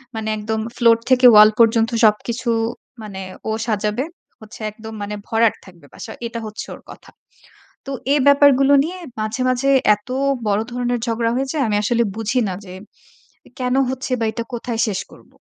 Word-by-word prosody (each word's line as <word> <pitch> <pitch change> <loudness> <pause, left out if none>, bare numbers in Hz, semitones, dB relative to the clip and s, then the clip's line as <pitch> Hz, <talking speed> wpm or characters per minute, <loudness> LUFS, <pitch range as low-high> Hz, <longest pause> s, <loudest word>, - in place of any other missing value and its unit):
মানে 220 0 -3
একদম 220 +1 -3 0.2
ফ্লোর 230 -1 +5
থেকে 255 0 +4
ওয়াল 210 0 +9
পর্যন্ত 225 0 +4 0.2
সবকিছু 235 +3 +1 0.5
মানে 195 -2 -7 0.3
ও - - 0 0.2
সাজাবে। 215 +4 -1 0.4
হচ্ছে 220 +2 -13
একদম 220 +1 -10
মানে 205 +1 -4
ভরাট 225 -1 +2
থাকবে 175 -5 -17
বাসা। 220 - -9 0.2
এটা 230 0 -6
হচ্ছে 215 0 -7
ওর - - -16
কথা। - - -15 0.8
তো - - -5 0.2
এ - - +3
ব্যাপারগুলো 280 -1 +5
নিয়ে, 360 +3 -5 0.2
মাঝে, 215 +4 -3
মাঝে 255 +2 +1 0.3
এত 210 - -23 0.4
বড় 205 0 +2
ধরনের 245 0 -1
ঝগড়া 230 0 0
হয়ে 270 +1 -1
যায় 290 -4 0
আমি 210 - +1
আসলে 235 +3 +1
বুঝি 225 +3 0
না 185 - -3
যে 185 - -10 0.9
কেন 250 0 0
হচ্ছে? 260 0 -5
বা 225 - 0
এটা 230 +1 -4
কোথায় 235 -1 -4
শেষ 195 -3 -2
করব? - - -18
230 Hz, 170 wpm, -20 LUFS, 215-250 Hz, 0.9 s, ওয়াল